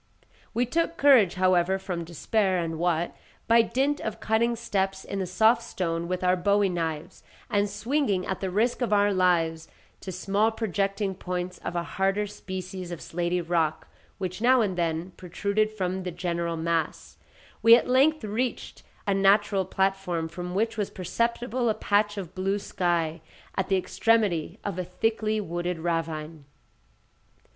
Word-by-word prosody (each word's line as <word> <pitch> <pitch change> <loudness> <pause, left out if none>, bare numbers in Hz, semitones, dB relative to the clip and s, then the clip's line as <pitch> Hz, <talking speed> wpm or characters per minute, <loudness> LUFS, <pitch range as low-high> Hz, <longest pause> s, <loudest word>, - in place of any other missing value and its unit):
We 245 +2 +2
took 335 +5 -1
courage, 250 -11 +5
however, 185 0 +3
from 180 -3 -4
despair, 190 +4 0
and 165 -2 -2
what, 170 -1 0 0.3
by 230 0 +6
dint 270 +5 0
of 220 - -4
cutting 230 +2 +1
steps 195 -4 -2
in 200 - -4
the 190 - -2
soft 220 +6 +4
stone 170 -7 -3
with 185 +1 -2
our 180 0 +4
bowie 200 +2 +2
knives, 165 -1 -4 0.3
and 205 0 +2
swinging 210 -2 0
at 190 - -3
the 190 - -2
risk 225 +7 +1
of 240 - 0
our 205 0 +4
lives, 165 -3 +1 0.3
to 190 - -7
small 200 +4 +1
projecting 200 -2 -1
points 180 -1 -4
of 175 - -5
a 170 - 0
harder 195 +4 0
species 185 -2 -7
of 170 - -5
slaty 175 +1 -2
rock 160 -2 0 0.3
which 185 0 -4
now 250 +1 +5
and 195 -4 0
then 170 +1 -1
protruded 200 +4 -1
from 190 -3 -3
the 185 - -4
general 170 -1 -2
mass, 165 -1 -2 0.4
we 230 0 +9
at 240 - +1
length 280 +5 +3
reached 230 +4 -3 0.2
a 200 - +2
natural 195 0 +3
platform, 190 -4 -1
from 180 +2 -6
which 225 +3 0
was 205 -2 -1
perceptible 235 +5 -1
a 215 - +1
patch 205 0 +1
of 185 -5 -6
blue 195 +2 0
sky, 170 -4 -1 0.3
at 190 - -1
the 195 - +3
extremity 195 -3 +1
of 200 -3 -3
a - - 0
thickly 215 +4 -1
wooded 175 -2 -3
ravine. 160 -2 -3
190 Hz, 160 wpm, -26 LUFS, 175-215 Hz, 0.4 s, we